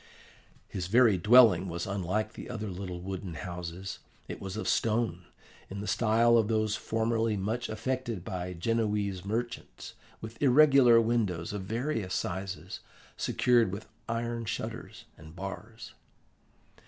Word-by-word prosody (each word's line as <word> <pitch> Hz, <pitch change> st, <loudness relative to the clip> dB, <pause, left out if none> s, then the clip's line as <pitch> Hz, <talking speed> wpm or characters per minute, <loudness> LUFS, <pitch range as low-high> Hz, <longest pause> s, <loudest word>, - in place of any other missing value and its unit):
"His 90 Hz, -2 st, -4 dB
very 110 Hz, -2 st, +5 dB
dwelling 105 Hz, -3 st, +6 dB
was 85 Hz, +1 st, -3 dB
unlike 100 Hz, +3 st, -2 dB
the -, -, -9 dB
other 110 Hz, -4 st, -4 dB
little 90 Hz, -1 st, -6 dB
wooden 95 Hz, -2 st, -5 dB
houses. 90 Hz, +4 st, -6 dB, 0.3 s
It -, -, -7 dB
was 95 Hz, +1 st, -5 dB
of 110 Hz, -, -3 dB
stone, 110 Hz, -6 st, 0 dB, 0.4 s
in 100 Hz, -, -6 dB
the 105 Hz, -, -5 dB
style 115 Hz, +3 st, +3 dB
of 110 Hz, -, +1 dB
those 110 Hz, -1 st, +1 dB
formerly 115 Hz, -1 st, 0 dB
much 110 Hz, +5 st, -2 dB
affected 115 Hz, -3 st, -3 dB
by 90 Hz, 0 st, -4 dB
Genoese 105 Hz, -1 st, -1 dB
merchants, 115 Hz, +4 st, -5 dB, 0.3 s
with 110 Hz, +1 st, -9 dB
irregular 135 Hz, -3 st, +6 dB
windows 105 Hz, -7 st, 0 dB
of 100 Hz, -2 st, -4 dB
various 115 Hz, -3 st, -2 dB
sizes, 95 Hz, +1 st, -4 dB, 0.4 s
secured 120 Hz, -5 st, +2 dB
with 100 Hz, +3 st, -7 dB, 0.2 s
iron 115 Hz, 0 st, -2 dB
shutters 105 Hz, -, -5 dB
and 80 Hz, +1 st, -13 dB
bars. 100 Hz, +4 st, -8 dB
105 Hz, 130 wpm, -29 LUFS, 95-115 Hz, 0.4 s, dwelling